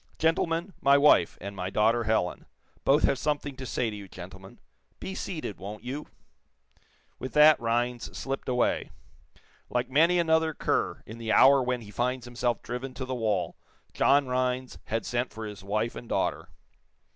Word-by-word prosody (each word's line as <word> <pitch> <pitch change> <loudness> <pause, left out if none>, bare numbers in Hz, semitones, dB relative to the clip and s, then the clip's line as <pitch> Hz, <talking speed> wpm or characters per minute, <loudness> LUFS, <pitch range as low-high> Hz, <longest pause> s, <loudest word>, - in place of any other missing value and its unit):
"Gentlemen, 165 +3 0
my 140 0 +6
wife, 140 - +4
and 100 0 -7
my 90 -1 -3
daughter, 110 +3 +2
Helen. 110 -5 0 0.4
Both 145 +3 +4
have 135 - +2
something 145 -2 -2
to 130 -1 -6
say 120 -2 -1
to - - -6
you, 100 -1 -9
gentlemen. 95 +1 -11 0.4
Be 190 - -5
seated, 160 - -5
won't 100 +2 -8
you?" 135 +5 -5 1.1
With 130 - -6
that 150 +1 +7
Rhinds 120 +1 -1
slipped 135 0 -4
away. 125 -1 +1 0.8
Like 125 +1 -1
many 165 +6 +4
another 160 -2 +2
cur, - - -1
in 110 +2 -10
the 115 -1 -2
hour 135 +3 +7
when 125 -1 -1
he 105 -2 -11
finds 125 +3 -1
himself 120 0 -2
driven 125 +2 -5
to 130 0 -4
the 130 - -4
wall, 105 -8 -1 0.4
John 140 0 +4
Rhinds 125 0 -1
had 115 +1 -2
sent 120 +1 -1
for 110 0 -7
his 105 -2 -8
wife 110 +4 -1
and 120 - -9
daughter. - - -1
125 Hz, 170 wpm, -28 LUFS, 110-140 Hz, 1.1 s, that